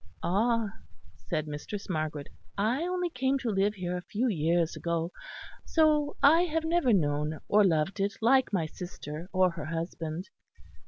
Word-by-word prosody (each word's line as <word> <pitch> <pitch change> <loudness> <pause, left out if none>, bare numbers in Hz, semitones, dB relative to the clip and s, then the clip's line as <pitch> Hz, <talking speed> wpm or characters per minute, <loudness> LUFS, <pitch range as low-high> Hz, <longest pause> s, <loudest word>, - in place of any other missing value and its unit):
"Ah!" 220 +3 +1 0.6
said 155 -2 -1
Mistress 150 +7 -6
Margaret 155 -4 -3 0.3
"I 225 +8 +1
only 360 -1 -1
came 265 +1 +1
to 245 -4 -2
live 200 +1 +1
here 180 -2 -3
a 180 - -3
few 220 +7 -1
years 170 -4 +1
ago; 170 0 -2 0.5
so 300 -2 +2
I 320 +4 +7
have 325 -1 -1
never 325 -6 +2
known 150 -4 +1
or 210 +1 +5
loved 165 +1 +1
it 200 +1 0
like 260 +3 +4
my 180 -6 +1
sister 165 0 -7
or 185 -1 +3
her 165 -4 -6
husband. 165 +1 -4
195 Hz, 155 wpm, -29 LUFS, 165-250 Hz, 0.6 s, I